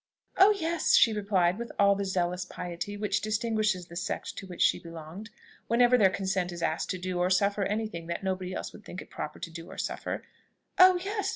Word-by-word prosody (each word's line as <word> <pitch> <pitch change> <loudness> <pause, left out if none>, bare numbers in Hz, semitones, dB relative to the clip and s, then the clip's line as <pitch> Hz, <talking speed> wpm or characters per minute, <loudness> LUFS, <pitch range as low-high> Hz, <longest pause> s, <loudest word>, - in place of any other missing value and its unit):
"Oh 390 +2 +7
yes," 330 -1 +2
she 225 - +6
replied 195 -2 +1
with 235 - -5
all 200 0 +5
the 200 0 -2
zealous 180 -1 -1
piety 180 +3 -6
which 205 -1 0
distinguishes 215 -3 0
the 170 - -12
sect 175 - -4
to 195 - -7
which 180 -2 -1
she - - +3
belonged, 165 +5 -9 0.4
whenever 245 +1 +4
their 205 -6 +5
consent 190 -2 -1
is 170 -1 -6
asked 160 - -1
to 185 - -1
do 180 0 -3
or 180 +1 +2
suffer 200 +2 +2
any 215 +3 -1
thing 170 -5 -8
that 170 - -4
nobody 185 -1 -2
else - - -5
would 215 - -13
think 185 - -8
it - - -23
proper 150 - -6
to 165 - -7
do 165 +1 -9
or - - -10
suffer, - - -4 0.6
"Oh 370 0 +9
yes! 405 0 -2
195 Hz, 215 wpm, -29 LUFS, 180-215 Hz, 0.6 s, Oh